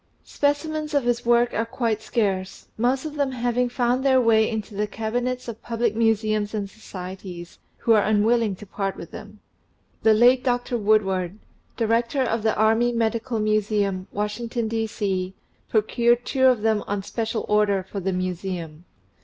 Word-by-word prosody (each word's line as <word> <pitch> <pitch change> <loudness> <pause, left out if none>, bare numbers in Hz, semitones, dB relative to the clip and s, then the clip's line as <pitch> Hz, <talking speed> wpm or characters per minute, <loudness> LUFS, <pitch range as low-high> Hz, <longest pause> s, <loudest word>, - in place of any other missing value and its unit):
Speci 290 +2 0
mens 310 -1 -3
of 285 - +3
his 240 -1 -1
work 240 0 +4
are 225 - +1
quite 230 -2 -2
scarce, 195 -4 -2
most 255 +5 0
of 300 -1 -6
them 280 -2 0
having 245 0 0
found 245 +1 0
their 265 -1 +4
way 220 -2 +4
into 220 -2 -4
the 210 +1 -1
cabinets 245 +4 -3
of 230 -2 -7
public 230 -2 -1
Museums 215 -2 +1
and 205 -2 -2
Societies, 185 -3 -9 0.2
who 230 - +3
are 215 - +5
unwilling 215 0 +2
to 210 - -11
part 195 0 -3
with 170 - -10
them. 210 -1 -11 0.6
The 220 -1 +5
late 245 +3 +5
Dr. 245 -1 0
Woodward, 200 -4 +1 0.4
Director 235 +3 +1
of 225 -2 -1
the 220 0 +1
Army 225 +3 +3
Medical 230 0 -1
Museum, 210 -3 0
Washington, 225 +3 -2
D.C., 205 -4 -2 0.3
procured 235 +2 +2
two 260 -1 +3
of 245 -5 +3
them 220 -2 +2
on 200 -1 -2
special 225 +2 -3
order 210 -2 +2
for 195 +2 -6
the 190 0 -1
Museum. 180 -3 -4
220 Hz, 160 wpm, -24 LUFS, 205-240 Hz, 0.6 s, are